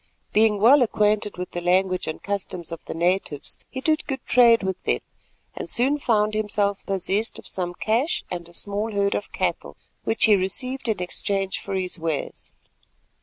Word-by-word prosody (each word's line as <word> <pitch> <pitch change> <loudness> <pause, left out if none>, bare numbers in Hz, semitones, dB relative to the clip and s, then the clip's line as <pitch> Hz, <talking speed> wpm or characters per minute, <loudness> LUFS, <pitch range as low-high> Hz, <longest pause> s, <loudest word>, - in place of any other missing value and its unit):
Being 215 -1 +4
well 255 +7 +7
acquainted 210 -3 +1
with 180 0 -5
the 175 - -4
language 185 +1 +1
and 155 - -5
customs 190 -4 -4
of 165 - -7
the - - -6
natives, 170 -4 0
he 260 - -5
did 310 +2 +1
good 270 -1 -4
trade 235 -3 +5
with 190 -1 -2
them, - - 0 0.5
and - - -5
soon 275 +5 +1
found 215 -5 +2
himself 205 -2 0
possessed 195 +3 -1
of - - -11
some 175 -1 -3
cash 235 - 0
and 170 -1 -5
a - - -14
small 205 +5 0
herd 200 0 +1
of 205 - -3
cattle, - - -2 0.3
which 225 0 +2
he 215 -2 +6
received 250 +8 -2
in 210 -5 0
exchange 195 +1 -1
for 195 - -5
his 185 -2 -3
wares. 160 -3 -3
200 Hz, 175 wpm, -24 LUFS, 185-225 Hz, 0.5 s, well